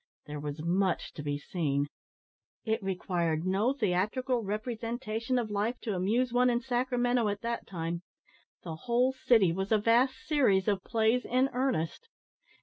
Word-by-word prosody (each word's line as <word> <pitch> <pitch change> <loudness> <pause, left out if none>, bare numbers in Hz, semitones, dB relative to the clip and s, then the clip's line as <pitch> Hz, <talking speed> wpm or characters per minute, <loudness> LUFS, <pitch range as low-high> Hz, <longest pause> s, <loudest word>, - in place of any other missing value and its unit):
There 150 0 -6
was 150 +1 -5
much 185 +1 0
to - - -7
be 145 0 -2
seen. 145 -2 -1 0.8
It 220 0 0
required 175 -4 -1
no 195 +7 +2
theatrical 235 +2 0
representation 225 +3 -2
of 230 -3 -1
life 210 +4 -1
to 220 - -2
amuse 230 +7 +1
one 250 +1 +4
in 240 -1 +2
Sacramento 245 -1 +1
at 205 0 -3
that 235 0 -3
time. 170 -1 -3 0.6
The 160 -3 -6
whole 245 +2 +3
city 225 -8 +4
was 190 +4 -3
a 220 - +6
vast 235 +5 +3
series 245 -11 +3
of 200 -3 +1
plays 225 +2 +2
in 255 +2 +1
earnest. 255 - -1
220 Hz, 150 wpm, -30 LUFS, 180-245 Hz, 0.8 s, a